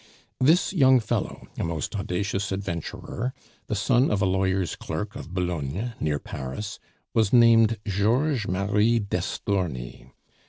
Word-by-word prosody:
This 160 +9 +4
young 130 -7 +6
fellow, 110 -2 -3
a - - 0
most 80 +1 -3
audacious 100 +1 -2
adventurer, 95 - -4 0.3
the 110 - -1
son 125 +6 +3
of 105 - +1
a 95 - +2
lawyer's 95 -1 +1
clerk 100 +7 -5
of - - -8
Boulogne, 90 - -2
near 75 -1 0
Paris, 70 +10 -6 0.3
was 110 -3 +2
named 115 -2 +6
Georges 110 +5 +1
Marie 105 +5 +2
Destourny. 85 - -3
100 Hz, 125 wpm, -26 LUFS, 90-115 Hz, 0.3 s, young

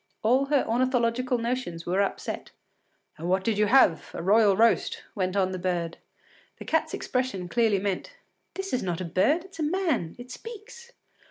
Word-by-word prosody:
All 255 +5 +3
her 280 -1 +2
ornithological 250 +1 +1
notions 230 -8 -3
were 185 +3 +1
upset. 200 - -3 0.7
“And 170 +2 -3
what 190 +1 +2
did 215 0 0
you 210 - +4
have? 205 - +4
A - - -4
royal 205 0 +4
roast,” 230 +1 +2
went 185 -2 -2
on 190 -2 +2
the 185 - -4
bird. 175 -2 -2 0.6
The - - -9
cat’s - - 0
expression 250 -8 -2
clearly 225 0 +2
meant: 200 - -3 0.4
“This 385 0 -5
is 255 - +1
not 175 -3 -2
a 185 - -3
bird; 275 - +2
it’s 380 -1 -15
a - - 0
man; 310 - 0
it 245 +1 -10
speaks. 470 - -10
230 Hz, 175 wpm, -27 LUFS, 185-265 Hz, 0.7 s, you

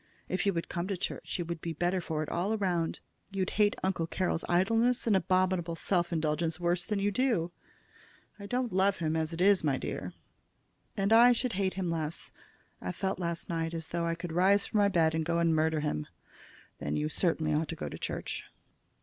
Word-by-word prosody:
If 185 +2 -1
you 200 - +3
would 165 -1 -2
come 175 0 -3
to 195 -2 -2
church - - -3
you 175 - -2
would 170 -1 -5
be 170 - -3
better 175 +4 0
for 155 -2 -2
it 150 - -6
all 195 +6 0
round. 175 -5 -1 0.3
You'd 195 -1 -2
hate 205 0 +4
Uncle 185 -3 0
Carroll's 180 -1 -1
idleness 225 +8 +3
and 220 -4 +4
abominable 185 -2 +1
self 175 +1 0
indulgence 160 +1 0
worse 175 0 0
than 210 - 0
you 200 +1 +1
do." 205 -7 +1 0.9
"I 200 - -7
don't 245 -1 -1
love 190 +1 +3
him, 160 -1 -1
as 160 0 -1
it 165 +1 -4
is, 195 -2 +5
my 140 -3 +2
dear." - - -5 0.8
"And 200 +2 +2
I 240 +2 +8
should 245 0 -1
hate 190 -1 0
him 185 -3 -1
less. 160 -1 -3 0.5
I 90 - -3
felt 190 - -2
last 170 -1 -3
night 165 0 -2
as 165 -1 -5
though 170 0 -1
I 165 - 0
could 170 -1 -6
rise 195 +3 +4
from 215 - 0
my 205 - +5
bed 165 -5 +3
and 160 0 0
go 170 +1 0
and 170 -1 +3
murder 160 0 +2
him." 75 - -2 0.7
"Then - - -2
you 150 0 0
certainly 155 -1 0
ought 155 +1 +1
to - - -4
go 75 - -5
to - - -6
church." - - -4
175 Hz, 210 wpm, -30 LUFS, 165-195 Hz, 0.9 s, I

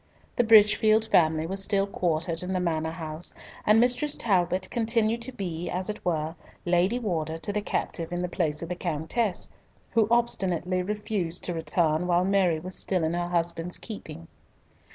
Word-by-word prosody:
The 245 - +3
Bridgefield 220 0 +5
family 160 -1 +3
was 195 +3 0
still 195 -1 +2
quartered 170 -3 -1
in 180 +1 -3
the 185 - 0
Manor 160 -3 -1
house, 160 0 -4 0.3
and 215 +1 +6
Mistress 250 +5 +3
Talbot 185 -3 +1
continued 230 -1 +1
to 250 +3 -2
be, 175 -7 -4
as 185 +3 -1
it 210 - -10
were, 160 -2 -1 0.3
Lady 180 +6 +2
Warder 165 -9 -2
to 200 +5 -3
the 210 - 0
captive 170 -4 -3
in 175 0 -2
the - - -1
place 160 -3 -2
of 170 - -6
the 180 - -2
Countess, 175 +5 -1 0.4
who 225 -2 +3
obstinately 185 -6 +1
refused 200 -3 -1
to 175 - +1
return 160 +1 0
while 175 +1 +2
Mary 190 -4 +2
was 185 +3 -6
still 185 -3 -1
in 160 +1 0
her 175 0 -1
husband's 170 0 -1
keeping. 165 -7 -9
180 Hz, 175 wpm, -27 LUFS, 165-210 Hz, 0.4 s, and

